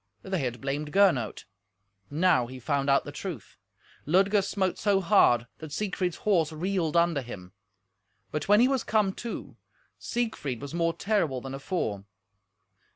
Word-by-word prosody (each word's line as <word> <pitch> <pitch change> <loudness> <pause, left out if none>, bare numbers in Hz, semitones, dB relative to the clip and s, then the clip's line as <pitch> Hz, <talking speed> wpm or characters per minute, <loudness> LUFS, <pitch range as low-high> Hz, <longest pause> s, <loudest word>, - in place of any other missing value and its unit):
They 190 -2 -2
had 125 -4 -3
blamed 145 +2 -3
Gernot. 165 - +2 0.6
Now 150 -5 +3
he 130 +1 -9
found 140 +1 0
out 140 - +4
the 145 - -6
truth. 150 - -7 0.5
Ludger 195 +5 +4
smote 190 -1 -1
so 200 -2 +3
hard 170 - +4
that 155 -2 -8
Siegfried's 180 -1 -2
horse 170 -7 +3
reeled 170 0 -1
under 170 -4 +3
him. 95 -7 -9 0.8
But 150 -1 -3
when 205 +2 +6
he 250 - +6
was 265 -2 0
come 210 -3 +1
to, 235 - -6 0.4
Siegfried 220 - -3
was 140 +1 -7
more 165 -1 +1
terrible 180 -12 0
than 135 +1 -7
afore. 135 - -3
165 Hz, 150 wpm, -28 LUFS, 135-195 Hz, 0.8 s, when